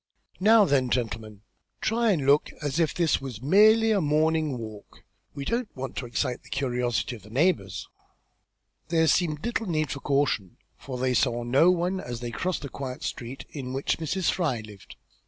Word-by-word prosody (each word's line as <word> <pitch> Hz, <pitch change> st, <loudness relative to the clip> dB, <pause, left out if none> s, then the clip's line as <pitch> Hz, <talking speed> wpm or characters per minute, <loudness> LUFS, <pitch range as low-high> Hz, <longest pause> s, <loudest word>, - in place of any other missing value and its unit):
Now 215 Hz, +2 st, +6 dB
then, 135 Hz, -6 st, +2 dB
gentlemen, 110 Hz, -4 st, -3 dB, 0.4 s
try 230 Hz, +1 st, +1 dB
and 155 Hz, -8 st, 0 dB
look 145 Hz, +2 st, +4 dB
as 145 Hz, +2 st, -2 dB
if 165 Hz, -2 st, +2 dB
this 170 Hz, -5 st, +1 dB
was 130 Hz, -6 st, -6 dB
merely 215 Hz, -, +5 dB
a 205 Hz, -3 st, +3 dB
morning 155 Hz, -2 st, +1 dB
walk. 110 Hz, -3 st, -10 dB, 0.3 s
We 140 Hz, -1 st, -5 dB
don't 235 Hz, -, -1 dB
want 130 Hz, 0 st, -5 dB
to 125 Hz, -, -3 dB
excite 125 Hz, +2 st, -2 dB
the -, -, -18 dB
curiosity 125 Hz, -2 st, -1 dB
of 110 Hz, -, -13 dB
the 105 Hz, -, -15 dB
neighbours." 115 Hz, -, 0 dB, 1.0 s
There 160 Hz, 0 st, +3 dB
seemed 155 Hz, 0 st, +1 dB
little 235 Hz, -2 st, -2 dB
need 155 Hz, -4 st, 0 dB
of -, -, -2 dB
this 140 Hz, -, -8 dB
caution, 140 Hz, -10 st, 0 dB, 0.2 s
for 130 Hz, -2 st, -7 dB
they 130 Hz, 0 st, 0 dB
saw 120 Hz, -2 st, +1 dB
no 135 Hz, +8 st, +4 dB
one 180 Hz, +1 st, +1 dB
as 120 Hz, -8 st, -6 dB
they 120 Hz, 0 st, -5 dB
crossed 180 Hz, +5 st, -2 dB
to -, -, -4 dB
the -, -, -15 dB
quiet 130 Hz, -2 st, -6 dB
street 125 Hz, +2 st, -5 dB
in 130 Hz, -3 st, -6 dB
which 135 Hz, +4 st, -1 dB
Mrs. 165 Hz, +3 st, 0 dB
Fry 150 Hz, -11 st, -1 dB
lived. 105 Hz, -3 st, -13 dB
140 Hz, 190 wpm, -26 LUFS, 125-170 Hz, 1.0 s, Now